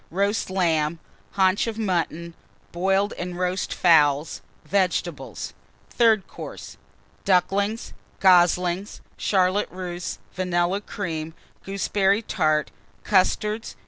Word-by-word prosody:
Roast 200 Hz, +4 st, 0 dB
Lamb. 165 Hz, -4 st, +1 dB, 0.4 s
Haunch 190 Hz, +3 st, +2 dB
of 225 Hz, -1 st, -4 dB
Mutton. 170 Hz, -5 st, -2 dB, 0.4 s
Boiled 195 Hz, +3 st, +1 dB
and 180 Hz, 0 st, -4 dB
Roast 180 Hz, +1 st, -1 dB
Fowls. 150 Hz, -3 st, +3 dB, 0.2 s
Vegetables. 190 Hz, -2 st, -2 dB, 0.4 s
THIRD 225 Hz, -4 st, +3 dB
COURSE. -, -, -9 dB, 0.5 s
Ducklings. 200 Hz, +4 st, +1 dB, 0.3 s
Goslings. 180 Hz, +1 st, +3 dB
Charlotte 190 Hz, +1 st, +1 dB
Russe. 180 Hz, -1 st, -5 dB, 0.2 s
Vanilla 180 Hz, +1 st, 0 dB
Cream. 165 Hz, -7 st, -5 dB, 0.3 s
Gooseberry 195 Hz, +1 st, +1 dB
Tart. 155 Hz, -7 st, 0 dB, 0.3 s
Custards. 210 Hz, +3 st, +1 dB
185 Hz, 90 wpm, -24 LUFS, 175-200 Hz, 0.5 s, Fowls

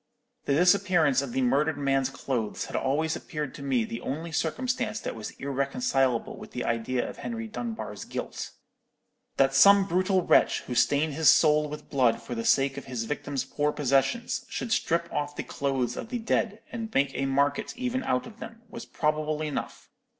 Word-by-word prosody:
The 140 Hz, -, +2 dB
disappearance 180 Hz, -5 st, +4 dB
of 140 Hz, -3 st, -5 dB
the 130 Hz, -, 0 dB
murdered 145 Hz, +5 st, +2 dB
man's 135 Hz, -2 st, +1 dB
clothes 120 Hz, -6 st, -3 dB
had -, -, -8 dB
always 155 Hz, +4 st, 0 dB
appeared 150 Hz, -4 st, -5 dB
to -, -, -10 dB
me 130 Hz, -4 st, +1 dB
the 115 Hz, -, -6 dB
only 160 Hz, +5 st, -4 dB
circumstance 225 Hz, +7 st, -1 dB
that -, -, -4 dB
was 110 Hz, -2 st, -6 dB
irreconcilable 135 Hz, -, 0 dB
with -, -, -11 dB
the 125 Hz, -, -3 dB
idea 115 Hz, +2 st, -1 dB
of -, -, -8 dB
Henry 230 Hz, -1 st, -5 dB
Dunbar's 220 Hz, -, -5 dB
guilt. -, -, -5 dB, 0.9 s
That 135 Hz, 0 st, +4 dB
some 200 Hz, +8 st, +7 dB
brutal 185 Hz, 0 st, +1 dB
wretch, -, -, +4 dB
who 125 Hz, -, -6 dB
stained 145 Hz, +5 st, +2 dB
his 155 Hz, +1 st, +5 dB
soul 150 Hz, -1 st, +5 dB
with 150 Hz, +1 st, -9 dB
blood 125 Hz, -5 st, +3 dB
for -, -, -7 dB
the 115 Hz, -1 st, -3 dB
sake 135 Hz, 0 st, +3 dB
of -, -, -6 dB
his 125 Hz, -3 st, -3 dB
victim's 145 Hz, +1 st, -3 dB
poor 150 Hz, 0 st, 0 dB
possessions, 150 Hz, -, 0 dB
should 235 Hz, -, -4 dB
strip 170 Hz, -6 st, +1 dB
off 145 Hz, 0 st, -2 dB
the -, -, -3 dB
clothes 130 Hz, -4 st, -2 dB
of -, -, -6 dB
the 245 Hz, -, -2 dB
dead, 225 Hz, -2 st, -1 dB
and 225 Hz, -1 st, -5 dB
make 135 Hz, 0 st, +3 dB
a 135 Hz, -, -1 dB
market 140 Hz, -, 0 dB
even 255 Hz, +1 st, -2 dB
out 125 Hz, -, 0 dB
of 225 Hz, 0 st, -12 dB
them, 225 Hz, 0 st, -10 dB
was -, -, -8 dB
probable 155 Hz, 0 st, -1 dB
enough. 150 Hz, -2 st, -5 dB
145 Hz, 185 wpm, -27 LUFS, 135-195 Hz, 0.9 s, some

